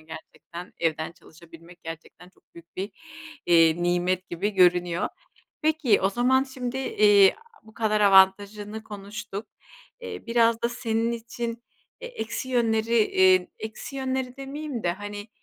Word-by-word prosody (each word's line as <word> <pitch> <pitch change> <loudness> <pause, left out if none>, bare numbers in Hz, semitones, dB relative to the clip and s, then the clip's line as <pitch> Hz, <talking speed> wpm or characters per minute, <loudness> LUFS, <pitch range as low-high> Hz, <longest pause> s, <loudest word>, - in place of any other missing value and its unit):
gerçekten 160 +2 -11
evden 160 -1 -1
çalışabilmek 165 +1 -17
gerçekten 165 +2 -10
çok - - -31
büyük 170 0 -16
bir, 195 +3 -4 0.6
eee, 165 0 +4
nimet 180 +1 0
gibi 190 +5 -2
görünüyor. 180 -2 +2 0.5
Peki, 310 -8 +2
o 195 +1 +2
zaman 255 +4 +2
şimdi, 260 -1 -5
eee, 205 -6 +5 0.3
bu 220 0 -18
kadar 215 -2 0
avantajını 205 +2 +3
konuştuk. 205 0 -7 0.5
Eee, 470 -2 -8
biraz 230 -1 +2
da 235 - +2
senin 230 -1 -1
için, 235 0 -5 0.4
eee, - - -7
eksi 260 - -5
yönleri, 230 -2 +1
eee, 185 -3 +4
eksi 220 +5 -7
yönleri 260 -1 -3
demeyeyim 275 -2 -6
de, 175 - +1
hani, 205 +2 -8
210 Hz, 130 wpm, -25 LUFS, 180-235 Hz, 0.6 s, eee